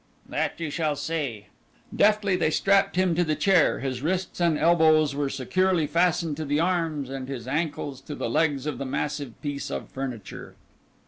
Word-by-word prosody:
"That - - -2
you 160 -3 -3
shall 155 -1 0
see." 145 -8 -3 0.5
Deftly 205 -2 +3
they 175 -3 +1
strapped 195 +4 +2
him 185 -1 +2
to 175 +2 +2
the 155 -2 0
chair; 190 -3 +3
his 130 -2 -3
wrists 180 +5 -2
and 170 -3 +3
elbows 155 -3 +4
were 140 0 -1
securely 170 +6 +1
fastened 165 -2 +1
to 160 - -3
the 145 +1 0
arms, 165 -5 0
and 135 -1 -5
his 130 -3 -6
ankles 145 -2 -2
to 145 +2 -7
the - - -3
legs 140 +2 +1
of 150 -5 -3
the 140 - -3
massive 140 -2 -3
piece 145 -1 -4
of - - -5
furniture. 125 -6 -7
155 Hz, 180 wpm, -26 LUFS, 140-170 Hz, 0.5 s, elbows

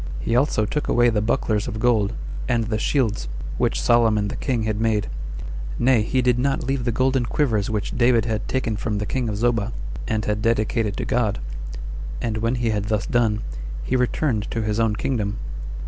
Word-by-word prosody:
He 95 - 0
also 125 -4 +3
took 150 +7 -2
away 120 0 +4
the 105 -2 +1
bucklers 105 -1 0
of 110 - -4
gold, 110 -3 +2 0.4
and 120 -2 +2
the 110 0 -1
shields, 115 - +1 0.3
which - - +1
Solomon 110 - +3
the - - -4
king 125 -5 -1
had 110 0 -1
made; 110 -2 +2 0.7
nay, 120 -2 +4
he 125 +4 +1
did 125 -1 +3
not 135 +1 +1
leave 130 -1 -1
the 120 - +2
golden 130 +2 +2
quivers 115 -10 +1
which 105 -2 -2
David 120 -2 +4
had 110 -2 -2
taken 115 -5 -1
from 105 -1 -2
the 105 - -1
king 125 +1 -1
of 105 - -2
Zobah, 115 0 +1 0.3
and 110 -1 0
had 105 0 0
dedicated 110 -1 +1
to - - -2
God; 110 -4 +1 0.8
and 110 -2 -1
when 115 +3 +1
he 120 -2 0
had 105 -1 -1
thus 105 -1 0
done, 110 -3 +2 0.4
he - - 0
returned 125 -3 +1
to 115 - -2
his 105 0 0
own 110 -2 +2
kingdom. 105 -4 -1
115 Hz, 195 wpm, -23 LUFS, 105-120 Hz, 0.8 s, away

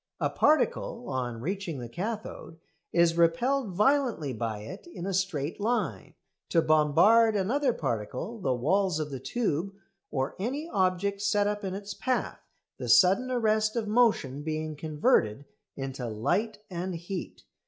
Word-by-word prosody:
A - - 0
particle, 255 -4 +1
on 120 -3 -3
reaching 185 0 -3
the 120 -2 -6
cathode, 180 - -5 0.3
is 170 -1 +3
repelled 235 +10 +2
violently 215 - +2
by 110 -2 -3
it 185 - -9
in 265 - -7
a 195 - -2
straight 175 -5 -1
line, 235 +4 -2 0.3
to 170 - +3
"bombard" 175 +9 +5
another 250 +8 +1
particle, 130 - -3
the 135 - 0
walls 160 +7 +1
of 150 -1 -3
the 135 - -5
tube, 195 - -2 0.3
or 135 -2 -2
any 270 - -3
object 200 - 0
set 205 0 +2
up 205 0 -2
in 190 -1 -3
its 200 0 -6
path, 255 +5 -2 0.4
the - - -4
sudden 195 +8 +5
arrest 215 -3 +1
of 225 -3 -1
motion 210 - +2
being 155 0 -3
converted 150 - +1 0.3
into 135 -2 -4
light 175 - -1
and 180 -1 -4
heat. 175 +2 -6
185 Hz, 145 wpm, -28 LUFS, 150-220 Hz, 0.4 s, bombard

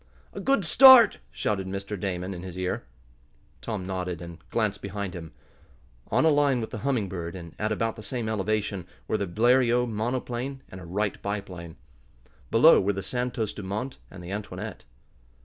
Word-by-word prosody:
"A - - -6
good 270 -9 +2
start!" 250 +4 +9
shouted 95 -3 -2
Mr. 100 +2 -4
Damon 90 0 -3
in 90 - -7
his 90 -1 -8
ear. 90 -8 -2 0.8
Tom 105 -5 -4
nodded, 90 -2 -3
and 85 0 -9
glanced 105 -3 -1
behind 100 -1 -4
him. 85 -3 -8 0.8
On - - +3
a - - +6
line 145 -3 +3
with 110 - -5
the 110 - -5
Humming 125 -5 0
Bird, 85 -2 -5
and 85 -3 -9
at 105 +1 -1
about 115 +1 -1
the - - -8
same 110 +2 -4
elevation, 105 -3 -1 0.2
were 110 - 0
the 100 - -1
Bleriot 120 +5 +3
monoplane 125 +4 -3
and 95 - -9
a - - -10
Wright 100 +5 -2
biplane. 95 -5 -5 0.7
Below - - +7
were 100 +2 +1
the 95 0 -4
Santos 120 -1 -2
Dumont 105 +7 -5
and 90 -2 -11
the 90 - -7
Antoinette. 105 +1 -6
100 Hz, 170 wpm, -27 LUFS, 95-120 Hz, 0.8 s, start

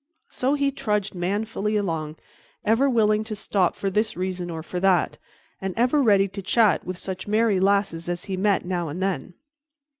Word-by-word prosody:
So 265 +3 0
he 280 -1 +1
trudged 210 -5 -1
manfully 210 +3 -1
along, 160 -6 -2 0.5
ever 225 +6 +3
willing 215 -3 +3
to 215 -1 -4
stop 195 -3 +1
for 195 - -2
this 215 +1 0
reason 180 -1 -3
or 160 -1 -5
for 180 +2 -4
that, 185 -3 +2 0.4
and 190 -1 -3
ever 250 +5 +3
ready 200 -5 +4
to 195 +1 -7
chat 205 0 +3
with 185 +1 -5
such 185 +1 -6
merry 215 -2 +2
lasses 195 -4 +1
as 175 0 -3
he 195 - -3
met 195 0 +1
now 175 -2 -2
and 155 +5 -5
then. 185 -3 -2
195 Hz, 180 wpm, -24 LUFS, 180-215 Hz, 0.5 s, ready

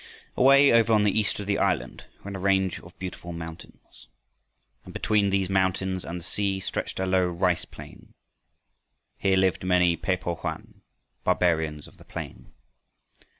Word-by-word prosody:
Away 140 +2 +6
over 115 -1 +4
on 105 -1 +4
the 105 - +3
east 105 - -1
of 100 - -5
the 100 0 0
island - - -1 0.2
ran 100 0 -6
a - - -5
range 95 -1 +1
of 85 - -16
beautiful 90 -2 -7
mountains. 85 0 -11 0.8
And - - -12
between 105 -2 +2
these 95 -1 +1
mountains 95 -1 0
and 90 +1 -5
the - - -13
sea 100 0 -1
stretched 95 - -4
a 95 - 0
low 95 -1 +2
rice 90 0 0
plain. - - -14 1.0
Here 95 -1 +2
lived 95 -2 +1
many 90 -2 +3
Pe 90 +3 -1
po 90 -1 -3
hoan, - - -7 0.4
"Barbarians 80 -4 +1
of - - -19
the - - -16
plain." - - -8
95 Hz, 160 wpm, -26 LUFS, 90-100 Hz, 1.0 s, Away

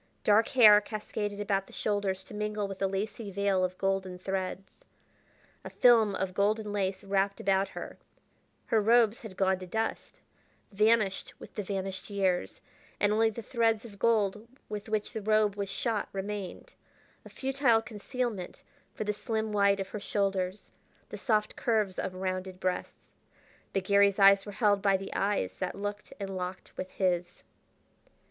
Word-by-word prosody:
Dark 215 +2 +4
hair 210 -5 +7
cascaded 210 -1 -4
about 195 -1 0
the - - -16
shoulders 200 -2 -1
to - - -13
mingle 210 -1 -2
with 195 -1 -8
a 195 - +3
lacy 205 +2 -4
veil 195 -1 +1
of 185 0 -2
golden 195 -1 -1
threads. 190 0 -3 1.0
A - - -7
film 225 -5 +5
of 185 -1 -2
golden 210 +2 0
lace 190 -2 -1
wrapped 195 0 0
about 195 0 +2
her - - -8 0.7
her 220 - +2
robes 230 +1 +4
had 205 -4 -10
gone 190 -1 +2
to 185 - -8
dust, 220 +4 -3 0.5
vanished 215 -1 +2
with - - -12
the 210 - -3
vanished 195 0 -4
years 190 -3 -1 0.4
and 205 0 +3
only 225 +1 +3
the 225 +1 -7
threads 225 -1 +1
of 200 -4 -12
gold 215 -1 +1 0.2
with 210 +1 -6
which 215 -1 -1
the 220 - -4
robe 215 -1 +2
was 200 -1 -3
shot 225 0 -1
remained, 195 -1 -5 0.5
a - - -12
futile 265 -3 +2
concealment 225 -2 -4 0.3
for - - -3
the 210 0 -1
slim 220 +1 -2
white 200 -1 +3
of 195 - -4
her 210 - -5
shoulders, 195 -1 -2 0.4
the - - -6
soft 215 -3 0
curves 215 -5 0
of 185 - -3
rounded 185 0 -4
breasts. 185 -1 -4 0.6
But 195 - -1
Garry's 200 0 +4
eyes 195 0 +6
were - - -5
held 205 -1 +2
by 195 -1 +3
the 195 0 -7
eyes 195 - -1
that 185 -1 -3
looked 205 +1 -5
and 195 -1 -4
locked 180 0 -6
with 185 - -5
his. 175 -2 -1
200 Hz, 165 wpm, -30 LUFS, 190-215 Hz, 1.0 s, hair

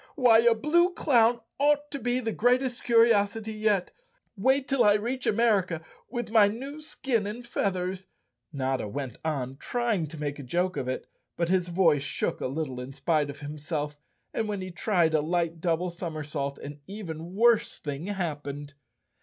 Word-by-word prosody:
Why, 245 -5 +6
a 235 0 +5
blue 345 +9 +3
clown 235 -4 +3 0.2
ought 290 +1 +2
to 280 - -3
be 245 +1 0
the 225 -3 -2
greatest 245 +2 +1
curiosity 225 -2 +3
yet. 210 -4 +1 0.4
Wait 265 +6 +2
till 270 -2 +3
I 205 - +6
reach 245 +5 -2
America 200 -7 +2 0.2
with 240 -1 -4
my 220 -3 +7
new 270 +8 -5
skin 260 -8 -1
and 235 +4 -6
feathers." 190 -4 -2 0.4
Notta 130 -5 -1
went 130 +1 -5
on 135 -4 -2
try¬ 240 - -1
ing 170 -6 -1
to 160 +2 -9
make 145 -1 -3
a - - -6
joke 180 +8 0
of 135 -3 -3
it, 130 - -3 0.3
but 170 -1 0
his 180 -1 +2
voice 170 -5 +3
shook 135 -1 -2
a - - 0
little 135 -2 -3
in 130 +2 -8
spite 150 0 +1
of 140 +1 -8
himself, 150 0 -4 0.4
and 220 - -1
when 205 -2 -3
he 185 0 -6
tried 175 -3 +1
a 155 - +3
light 165 0 -1
double 175 +1 0
som¬ 170 -1 -5
ersault 140 -2 -3
an 145 +1 -8
even 180 -4 -7
worse 230 +1 +4
thing 145 +4 -5
happened. 145 -7 -4
185 Hz, 180 wpm, -28 LUFS, 150-230 Hz, 0.4 s, my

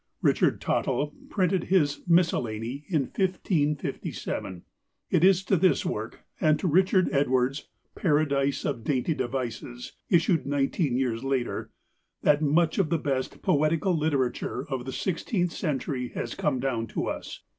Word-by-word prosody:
Richard - - +3
Tottel 145 0 0 0.2
printed 185 -2 +1
his 165 -6 +2
"Miscellany" 135 -6 +1
in 160 -6 +2
1557. 150 - -2 0.5
It 160 - +3
is 190 0 +5
to 195 - +2
this 180 -4 +3
work, 110 +2 -4 0.2
and 155 -1 +3
to 185 - -2
Richard 185 +3 +3
Edwards' 135 -1 +1 0.3
"Paradise 145 -4 +1
of 130 -6 -2
Dainty 140 +4 0
Devices," 120 - -4 0.2
issued 165 -3 +3
nineteen 140 -1 0
years 125 -3 -1
later, 135 -3 -2 0.5
that 150 0 +4
much 155 +4 +2
of 180 -6 +2
the 170 - +2
best 135 -4 -3
poetical 155 +5 +2
literature 140 -4 -1
of 130 -3 -3
the 135 - -4
sixteenth 180 - -1
century 135 -6 -2
has - - -3
come 145 -4 0
down 120 -4 -1
to - - -3
us. - - -5
145 Hz, 135 wpm, -27 LUFS, 130-170 Hz, 0.5 s, is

